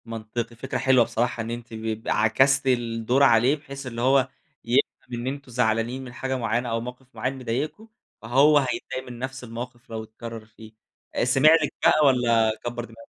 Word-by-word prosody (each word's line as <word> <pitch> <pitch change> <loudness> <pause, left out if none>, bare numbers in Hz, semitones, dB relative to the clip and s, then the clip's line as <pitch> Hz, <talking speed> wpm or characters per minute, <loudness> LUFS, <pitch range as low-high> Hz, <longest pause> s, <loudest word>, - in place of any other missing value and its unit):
منطقي 115 +1 -5
فكرة 125 +2 -4
حلوة 130 -1 +4
بصراحة 120 +1 -1
إن 115 - -5
أنتِ 120 0 -7
ب 110 0 -4
عكستِ 130 +6 +3
الدور 120 +1 +1
عليه، 125 +2 +5
بحيث 140 -2 -9
إن 115 -2 -6
هو 130 +1 +3 0.4
يفهم 120 0 -1
إن 120 - -4
أنتم 135 -1 -5
زعلانين 120 +2 0
من 125 -2 -10
حاجة 130 +1 -3
معيّنة 120 +1 -1
أو 115 0 -1
موقف 125 +2 -9
معيّن 130 +1 -2
مضايقكوا 135 - -3 0.3
فهو 135 +6 +4
هيتضايق 130 -1 -2
من 120 - -9
نفس 130 0 -5
الموقف 120 +1 -8
لو 110 -1 -5
اتكرر 115 0 -9
فيه، 110 0 -15 0.4
آآ، - - +1
سمع 135 +4 +5
لِك 145 - -2
بقى 155 -1 +5
والّا 120 -4 +3
كبر 120 0 -4
دماغه؟ 115 -1 -15
120 Hz, 180 wpm, -25 LUFS, 115-130 Hz, 0.4 s, عليه